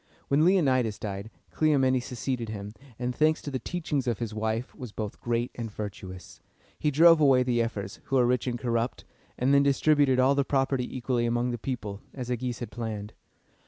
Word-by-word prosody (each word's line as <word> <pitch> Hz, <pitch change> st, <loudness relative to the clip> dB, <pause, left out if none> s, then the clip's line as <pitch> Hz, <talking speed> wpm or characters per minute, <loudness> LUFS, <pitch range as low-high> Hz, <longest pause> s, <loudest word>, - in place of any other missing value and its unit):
When 140 Hz, +3 st, +4 dB
Leonidas 130 Hz, -, +3 dB
died, 100 Hz, 0 st, -5 dB, 0.2 s
Cleomenes 130 Hz, -5 st, +2 dB
succeeded 125 Hz, -2 st, -3 dB
him, 105 Hz, -1 st, -6 dB, 0.2 s
and, 125 Hz, 0 st, -2 dB
thanks 155 Hz, 0 st, +3 dB
to 145 Hz, -, -5 dB
the 130 Hz, -, -2 dB
teachings 150 Hz, -3 st, -2 dB
of 120 Hz, -3 st, +1 dB
his 115 Hz, -3 st, -4 dB
wife, 110 Hz, +3 st, -2 dB
was 125 Hz, -4 st, -8 dB
both 105 Hz, -1 st, -6 dB
great 120 Hz, 0 st, -1 dB
and 115 Hz, -2 st, -5 dB
virtuous. 100 Hz, -3 st, -8 dB, 0.4 s
He 150 Hz, -, +2 dB
drove 165 Hz, +2 st, +6 dB
away 135 Hz, -3 st, +5 dB
the 120 Hz, -2 st, +1 dB
ephors, 100 Hz, -4 st, -4 dB
who 135 Hz, -, -1 dB
were 125 Hz, -2 st, +5 dB
rich 125 Hz, +1 st, +1 dB
and 120 Hz, -1 st, -1 dB
corrupt, 120 Hz, 0 st, -2 dB, 0.3 s
and 130 Hz, +3 st, +2 dB
then 140 Hz, -, +6 dB
distributed 140 Hz, -1 st, +3 dB
all 130 Hz, +2 st, +5 dB
the 140 Hz, 0 st, +2 dB
property 135 Hz, -2 st, 0 dB
equally 120 Hz, -1 st, 0 dB
among 120 Hz, +1 st, 0 dB
the 120 Hz, -, -4 dB
people, 105 Hz, -5 st, -4 dB
as 125 Hz, -2 st, -5 dB
Agis 125 Hz, -1 st, -2 dB
had 120 Hz, -, -6 dB
planned. 110 Hz, -3 st, -5 dB
125 Hz, 190 wpm, -28 LUFS, 115-135 Hz, 0.4 s, drove